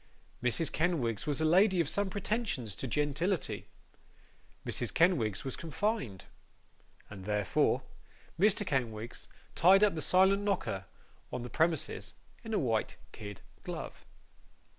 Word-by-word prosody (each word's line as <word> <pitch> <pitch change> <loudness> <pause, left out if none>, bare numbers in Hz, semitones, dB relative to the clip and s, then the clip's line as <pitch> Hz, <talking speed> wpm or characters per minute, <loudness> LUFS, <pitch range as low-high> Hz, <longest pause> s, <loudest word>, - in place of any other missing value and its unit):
Mrs. 125 +6 +2
Kenwigs 150 - 0
was 145 0 0
a - - +3
lady 185 +3 +5
of 165 - +2
some 190 +6 0
pretensions 200 - -2
to 135 - -4
gentility; 150 - -1 1.0
Mrs - - 0
Kenwigs 125 - +2
was 135 - -2
confined. 165 - -2 0.9
And, 95 -2 -9
therefore, 105 -2 +1 0.6
Mr. 205 +1 +3
Kenwigs 120 -6 -3 0.3
tied 190 +4 +6
up 210 - +5
the 160 - -3
silent 190 +4 +4
knocker 190 - -1 0.4
on 125 - -4
the 125 - -7
premises 165 0 0 0.3
in 225 - -6
a 215 - +2
white 115 -5 0
kid 105 -3 -8 0.2
glove. - - -6
155 Hz, 125 wpm, -32 LUFS, 115-190 Hz, 1.0 s, tied